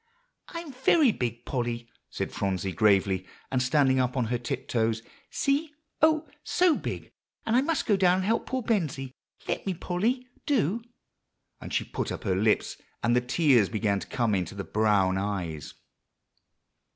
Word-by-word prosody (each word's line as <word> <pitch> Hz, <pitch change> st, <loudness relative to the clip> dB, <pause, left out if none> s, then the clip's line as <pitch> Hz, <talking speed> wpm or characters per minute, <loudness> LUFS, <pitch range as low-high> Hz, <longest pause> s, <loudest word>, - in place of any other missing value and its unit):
"I'm 335 Hz, -4 st, -7 dB
very 265 Hz, +1 st, +4 dB
big, 120 Hz, -, -4 dB
Polly," 120 Hz, -2 st, -2 dB, 0.2 s
said -, -, -4 dB
Phronsie 95 Hz, -1 st, -1 dB
gravely, 95 Hz, 0 st, +2 dB, 0.2 s
and 130 Hz, -1 st, +1 dB
standing 130 Hz, 0 st, +3 dB
up 125 Hz, +1 st, 0 dB
on 125 Hz, -, +2 dB
her 120 Hz, -, 0 dB
tiptoes. 115 Hz, -1 st, -1 dB, 0.3 s
"See 295 Hz, +2 st, 0 dB, 0.3 s
oh, 315 Hz, 0 st, +4 dB, 0.2 s
so 355 Hz, -3 st, +3 dB
big! -, -, -5 dB, 0.3 s
and 225 Hz, -, +1 dB
I 255 Hz, -, +5 dB
must 310 Hz, +1 st, 0 dB
go 210 Hz, -, +3 dB
down 185 Hz, -2 st, +4 dB
and 185 Hz, 0 st, -1 dB
help 225 Hz, +3 st, 0 dB
poor 260 Hz, -1 st, -2 dB
Bensie. 150 Hz, -, -1 dB, 0.3 s
Let -, -, -1 dB
me, 190 Hz, -, 0 dB
Polly, 215 Hz, +10 st, -1 dB, 0.2 s
do!" 235 Hz, -, +1 dB, 0.8 s
and -, -, -8 dB
she -, -, +1 dB
put -, -, -4 dB
up -, -, -5 dB
her 95 Hz, -, +1 dB
lips, 105 Hz, +3 st, +1 dB, 0.3 s
and 120 Hz, +1 st, +3 dB
the 125 Hz, -, +4 dB
tears 125 Hz, -, +3 dB
began 105 Hz, -2 st, 0 dB
to -, -, -8 dB
come 120 Hz, -4 st, 0 dB
into 95 Hz, -1 st, -1 dB
the 100 Hz, -, -4 dB
brown 100 Hz, -3 st, +2 dB
eyes. 90 Hz, -7 st, -4 dB
125 Hz, 165 wpm, -27 LUFS, -, 0.8 s, I